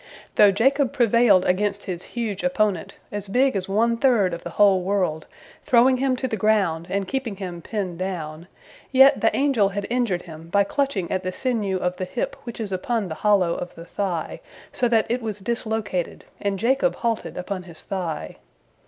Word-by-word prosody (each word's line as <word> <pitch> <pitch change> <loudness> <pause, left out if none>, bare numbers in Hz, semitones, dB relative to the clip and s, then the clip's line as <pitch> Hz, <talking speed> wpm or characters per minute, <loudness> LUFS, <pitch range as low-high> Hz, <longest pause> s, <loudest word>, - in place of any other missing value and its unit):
Though 205 - +7
Jacob 270 +7 +2
prevailed 235 -6 +4
against 200 +2 0
his 180 -3 -5 0.2
huge 215 -5 -2
opponent, 215 -10 0 0.2
as 205 -1 -5
big 255 +5 +2
as 190 -1 -2
one 230 +4 +2
third 230 -8 +3
of 170 - -5
the - - -5
whole 200 -3 +5
world, 180 -5 -1 0.4
throwing 255 +1 +4
him 265 0 +1
to 260 +1 -2
the 225 - -2
ground 190 -6 +1
and 195 0 -1
keeping 260 -3 -3
him 180 -3 -6
pinned 185 -2 -4
down, 170 -3 -5 0.4
yet 270 +1 +6
the - - +2
angel 265 -8 +3
had 200 +1 -4
injured 235 -8 0
him 160 -1 -11
by 200 +3 +4
clutching 220 -5 -1
at 185 - 0
the 185 - -3
sinew 210 -4 -1
of 180 0 -2
the 185 - -3
hip - - -3
which 235 -1 -7
is 215 -3 -4
upon 200 +2 -1
the - - -3
hollow 195 -5 +3
of 180 - -6
the 165 - -10
thigh, 175 -3 -3 0.3
so 245 - +1
that 225 -2 +3
it 245 +2 -1
was 215 -3 -4
dislocated, 215 -4 -3 0.2
and 200 -1 -1
Jacob 265 +6 +2
halted 230 -2 -2
upon 185 +1 -4
his 170 -3 -11
thigh. 170 - -4
200 Hz, 190 wpm, -23 LUFS, 185-235 Hz, 0.4 s, Though